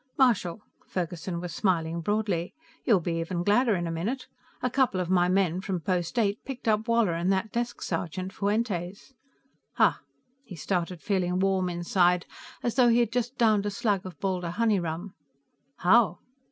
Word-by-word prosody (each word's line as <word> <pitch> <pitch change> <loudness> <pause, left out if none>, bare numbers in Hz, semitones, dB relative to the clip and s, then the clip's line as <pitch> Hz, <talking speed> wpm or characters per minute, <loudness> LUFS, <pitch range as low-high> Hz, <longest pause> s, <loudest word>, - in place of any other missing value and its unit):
"Marshal," 215 -7 +2 0.2
Ferguson 175 -4 -3
was 175 -2 -6
smiling 170 -3 0
broadly. 200 -3 -1 0.3
"You'll 205 -7 +4
be 165 0 -2
even 170 +1 -2
gladder 215 +3 +3
in 175 -1 -2
a 165 - -2
minute. 215 +11 -3 0.4
A 250 - +2
couple 255 -8 +2
of 180 0 -2
my 180 -1 +4
men, 185 -2 +1
from 190 -2 -2
Post 175 +5 -2
Eight, 210 -2 +1
picked 260 -3 -7
up 215 +1 +2
Woller 230 -6 +3
and 170 +3 0
that 195 +3 0
desk 240 0 -3
sergeant, 180 +2 -3
Fuentes." 200 +1 -2 0.6
"Ha!" - - +3 0.4
He 195 - -10
started 175 +1 -2
feeling 180 -3 0
warm 190 -1 +1
inside, 175 0 +2 0.4
as 240 - 0
though 250 -1 +5
he 230 - +4
had 235 -2 +2
just 245 +1 -2
downed 215 -3 +3
a - - +1
slug 200 -1 0
of 185 -2 -9
Baldur 185 -3 -1
honey 215 +2 +2
rum. 175 +3 -4 0.6
"How?" 190 -1 +4
190 Hz, 170 wpm, -27 LUFS, 175-220 Hz, 0.6 s, though